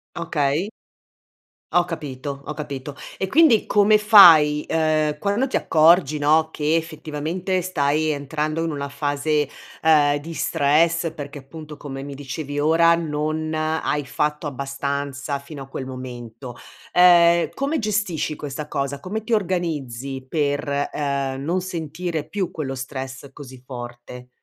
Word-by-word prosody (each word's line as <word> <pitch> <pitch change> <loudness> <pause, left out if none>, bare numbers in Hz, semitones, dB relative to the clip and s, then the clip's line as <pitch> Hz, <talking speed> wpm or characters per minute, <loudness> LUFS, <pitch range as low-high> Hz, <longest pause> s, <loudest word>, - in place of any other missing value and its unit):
Okay. 160 +2 -1 1.0
Ho 175 0 +4
capito, 140 -4 -6
ho 150 - -4
capito. 145 -1 -6 0.2
E 190 - -1
quindi 275 - +4
come 210 +1 +4
fai, 165 -8 +7
uhm, 155 -2 +1
quando 205 - 0
ti 260 - -4
accorgi, 155 -1 +4
no, 155 +2 +3
che 155 +1 0
effettivamente 165 +3 -2
stai 155 -3 0
entrando 155 +2 -2
in 165 - -2
una 140 -1 -4
fase, 145 +1 0 0.4
uhm, 150 -2 +5
di 160 +3 -8
stress 165 +3 +1
perché 145 -2 -8
appunto 150 +2 -10
come 135 -2 -7
mi 140 0 -7
dicevi 145 +1 -5
ora 165 +2 +4
non 155 0 -2
hai 155 -1 -1
fatto 150 +3 -2
abbastanza 140 0 -3
fino 140 +1 -10
a 135 - -8
quel 135 -1 -6
momento. 125 -1 -8 0.4
Ehm, 170 -1 +6
come 280 +4 -1
gestisci 200 - -1
questa 150 +1 -6
cosa? 140 -1 -3
Come 205 +8 -5
ti 235 - -2
organizzi 145 - -2
per, 145 -1 -1
uhm, 140 -2 -2
non 175 +4 0
sentire 165 -2 -4
più 190 +2 -2
quello 140 -4 -4
stress 135 0 -7
così 130 -3 -12
forte? 125 -1 -9
150 Hz, 135 wpm, -22 LUFS, 140-165 Hz, 1.0 s, fai